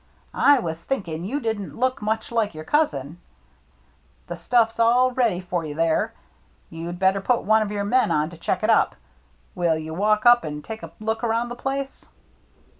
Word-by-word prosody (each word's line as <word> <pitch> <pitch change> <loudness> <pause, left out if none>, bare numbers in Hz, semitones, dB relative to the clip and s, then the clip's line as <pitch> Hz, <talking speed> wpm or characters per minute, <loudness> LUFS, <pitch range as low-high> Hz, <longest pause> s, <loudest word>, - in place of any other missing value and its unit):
" - - -36 0.2
I 285 - +6
was 165 -8 -3
thinking 170 -6 -4
you 270 +9 -2
didn't 220 -6 -4
look 255 +1 0
much 220 +2 -2
like 220 -6 0
your 155 - -7
cousin. 165 - -1 1.1
The - - -6
stuffs 230 -2 +1
all 245 +3 +4
ready 235 -8 +1
for 180 -2 -3
you 150 -2 -6
there. 165 0 0 0.6
You'd 165 +2 -6
better 190 +1 +2
put 245 +4 +1
one 220 +1 +4
of 215 - -1
your 205 -1 -2
men 255 +5 +2
on 150 +2 0
to 170 - -11
check - - -2
it - - +1
up. - - +3 0.6
Will 170 -3 +1
you 160 0 -6
walk 210 +5 +1
up 240 0 +7
and 150 -1 -6
take 220 0 -7
a - - -8
look 220 +2 -3
around 235 +1 0
the 240 - -6
place 270 +2 -4
215 Hz, 190 wpm, -23 LUFS, 170-240 Hz, 1.1 s, up